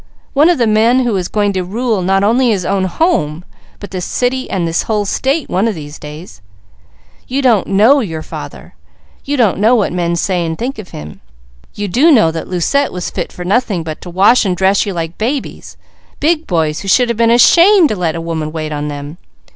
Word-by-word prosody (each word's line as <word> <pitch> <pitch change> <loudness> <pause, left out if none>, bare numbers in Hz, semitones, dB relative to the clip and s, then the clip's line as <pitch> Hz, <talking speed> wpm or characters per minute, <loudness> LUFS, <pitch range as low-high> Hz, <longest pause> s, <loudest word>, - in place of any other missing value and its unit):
One 295 +4 +4
of 350 - +2
the 240 - +2
men 225 +4 +3
who 235 -4 0
is 180 -2 -2
going 205 -1 0
to 185 -1 -2
rule, 220 +2 -2
not 195 +2 +1
only 240 +4 +2
his 195 -5 0
own 195 0 0
home, 180 - -1 0.3
but 205 - -9
this 185 -2 -4
city, 255 +5 -2
and 175 -3 -1
this 165 +2 0
whole 210 -2 -1
state, 270 +8 -1
one 195 +5 0
of 220 - -2
these 150 -1 -9
days. 150 - -11 0.9
You 270 +2 -2
don't 230 -6 +3
know 220 +9 +4
your 165 -10 -4
father. - - -9 0.5
You 285 +1 -2
don't 220 -7 +2
know 225 +4 +4
what 210 -6 0
men 170 -1 -1
say 180 0 -1
and 160 -1 -3
think 255 +1 -4
of 200 - -9
him. 75 0 -10 0.5
You 205 0 -3
do 270 - +3
know 215 - +4
that 160 0 -6
Lucette 225 - 0
was 180 -1 -5
fit - - -4
for 180 - -8
nothing 200 -3 0
but 155 -1 -7
to 180 - -9
wash 195 +8 +4
and 185 -4 -1
dress 195 +3 +2
you 200 - -3
like 165 -1 -5
babies, 255 +6 -4 0.4
big 320 +2 0
boys 160 -4 0
who 195 - -8
should 245 +5 +3
have 235 - 0
been 230 0 +3
ashamed 340 - +5
to - - -1
let 170 -4 -2
a 165 - -4
woman 160 -2 -4
wait 155 -1 -5
on 150 0 -3
them. 145 +3 -7
195 Hz, 220 wpm, -15 LUFS, 170-245 Hz, 0.9 s, ashamed